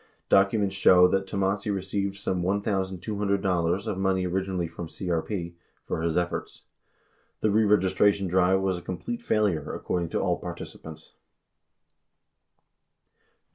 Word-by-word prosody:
Documents 100 0 +3
show 90 -2 +6
that 95 +1 0
Tomassi 100 +1 -1
received 100 0 -2
some 95 -2 -2
$1,200 95 -1 -1
of 105 -3 -2
money 95 -1 +1
originally 95 -1 -1
from 85 0 -8
CEP 85 0 -3 0.3
for - - -3
his 85 0 0
efforts. 90 0 -3 0.8
The 110 - +2
reregistration 100 -1 +3
drive 95 +1 +3
was 95 -2 0
a - - -13
complete 225 - -5
failure, 105 - 0
according 85 -2 -2
to - - -1
all - - 0
participants. 80 -1 -9
95 Hz, 115 wpm, -26 LUFS, 90-100 Hz, 0.8 s, show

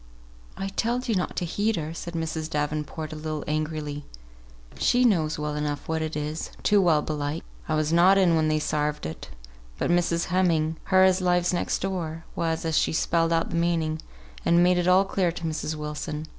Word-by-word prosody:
"I 195 - -3
telled 240 +5 -1
ye 230 - +1
not 185 -3 -1
to 180 - -1
heed 205 +6 0
her," 160 -1 -4
said 170 +1 -7
Mrs. 160 -1 -3
Davenport, 150 +1 -3
a - - -6
little 155 -1 -4
angrily. 150 -1 -3 0.8
"She 250 +1 +3
knows 160 -9 +2
well 150 0 -3
enough 150 -1 -3
what 160 0 -1
it 155 -1 -3
is, 150 +1 -3
too 205 -1 +4
well, 160 -5 +3
belike. 150 +1 -3 0.3
I 155 - +2
was 155 +1 0
not 180 +3 +6
in 180 -4 +4
when 160 -1 +2
they 155 0 +2
sarved 150 0 -1
it; 80 -4 -7 0.5
but - - 0
Mrs. 175 -1 +2
Heming 165 -4 +2
(her 190 -1 +5
as 190 0 +4
lives 180 0 +2
next 175 - -1
door) 165 -4 -3
was, 165 0 -1
and 160 - -1
she - - +2
spelled 165 +1 +1
out 165 0 +1
the - - -2
meaning, 165 -2 0 0.4
and 170 +1 +4
made 180 0 +4
it 175 - 0
all 185 +2 +5
clear 185 -3 0
to 170 - -8
Mrs. 155 0 -2
Wilson. 150 0 -5
160 Hz, 200 wpm, -26 LUFS, 155-180 Hz, 0.8 s, not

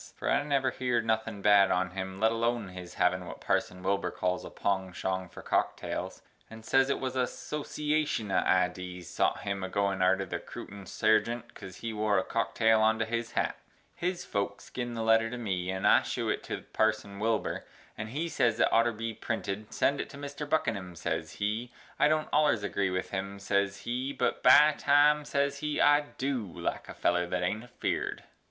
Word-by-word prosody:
For - - -2
I - - +3
never 140 -2 +1
heered 125 -3 0
nothin 110 -2 -1
bad 100 -2 +6
on 95 0 +1
him 95 0 -5
let 110 +1 +4
Alone 115 -2 0
his 90 -1 -9
havin 90 0 +1
what - - -8
Parson 90 0 -1
Wilbur 100 +1 0
cals 90 0 -1
a - - -7
pongshong 95 -1 -2
for - - -11
cocktales, - - -2 0.3
and 110 0 -11
ses 135 +2 +3
it 140 - 0
wuz 130 - -1
a 125 -1 +2
soshiashun 150 -6 -2
of 95 - +3
idees 90 -1 0
sot - - 0
him 100 -1 -3
agoin 95 0 0
arter 95 +1 +3
the - - -4
Crootin 100 -1 -9
Sargient 115 +2 +1
cos 95 -1 -10
he 115 - -2
wore 105 -1 +1
a 95 - +2
cocktale 110 0 +2
onto 110 +1 +3
his 115 0 -3
hat. - - 0 0.4
His 180 0 -2
Folks 100 -1 -3
gin 120 -1 -4
the 115 - -2
letter 115 0 +4
to 125 - -5
me 95 -6 -2
and 95 0 -2
I - - +6
shew - - -2
it - - 0
to - - -5
parson 110 -2 0
Wilbur 110 +1 0 0.3
and 110 0 -5
he 150 +8 -2
ses 120 -8 +1
it - - +4
oughter 115 +1 +4
Bee 115 +1 -4
printed, 105 -2 -4
send 140 0 +1
It - - -7
to - - -10
mister 145 +1 -6
Buckinum, 100 - -1
ses - - -3
he, 110 +4 -2 0.3
i - - +6
don't 155 0 0
ollers 145 -9 +3
agree 100 -1 0
with 90 0 -3
him, 100 +1 -3
ses 100 0 0
he, 125 +5 -3
but 130 - -1
by 150 +4 +7
Time, 150 +1 +4
ses 140 -1 0
he, 150 0 -2
I 145 0 +6 0.2
du 125 -8 -2
like - - -4
a - - -7
feller 90 0 +1
that 90 0 -1
ain't 105 +6 -1
a - - -15
Feared. - - -3
110 Hz, 195 wpm, -30 LUFS, 95-125 Hz, 0.4 s, by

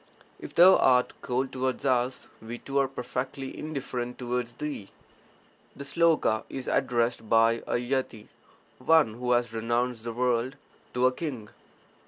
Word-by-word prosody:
If - - -10
thou 185 +2 +8
art 125 -1 +3
cold 130 +1 -1
towards 130 +1 -2
us, 125 -1 0
we 115 +2 -7
too 140 +3 -2
are 135 - +2
perfectly 130 +1 -5
indifferent 130 -5 -4
towards 120 -1 -3
thee. 145 -8 -5 0.9
[The 140 - -7
sloka 160 -7 +2
is 130 -2 -6
addressed 120 -3 0
by 115 +1 +4
a - - 0
yati 120 -3 -2 0.5
(one 145 -3 +4
who 125 +2 0
has 120 -2 +1
renounced 120 +1 -1
the 115 0 -4
world) 125 +2 0 0.4
to 125 +1 +2
a 130 - +5
king. 125 -7 -5
125 Hz, 145 wpm, -27 LUFS, 120-135 Hz, 0.9 s, thou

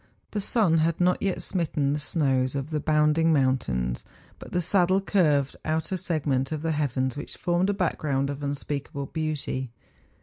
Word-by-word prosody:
The 210 - -2
sun 195 -6 +3
had 165 +1 +1
not 180 0 +2
yet 195 -2 -1
smitten 150 -6 0
the 150 - -1
snows 135 -4 0
of 140 +3 -3
the 155 - 0
bounding 155 +2 +3
moun¬ 130 -3 +3
tains; 60 - -3 0.4
but - - -11
the 180 - +1
saddle 185 +1 +3
curved 150 -9 +2
out 160 +1 -1
a 190 - 0
segment 145 -6 -1
of 155 -1 -3
the 165 - 0
heavens 130 -4 -1
which 145 - -6
formed 175 +2 +1
a - - +2
background 145 -7 0
of 140 +1 -6
unspeakable 140 0 -3
beauty. 150 -4 -3
150 Hz, 175 wpm, -26 LUFS, 140-170 Hz, 0.4 s, sun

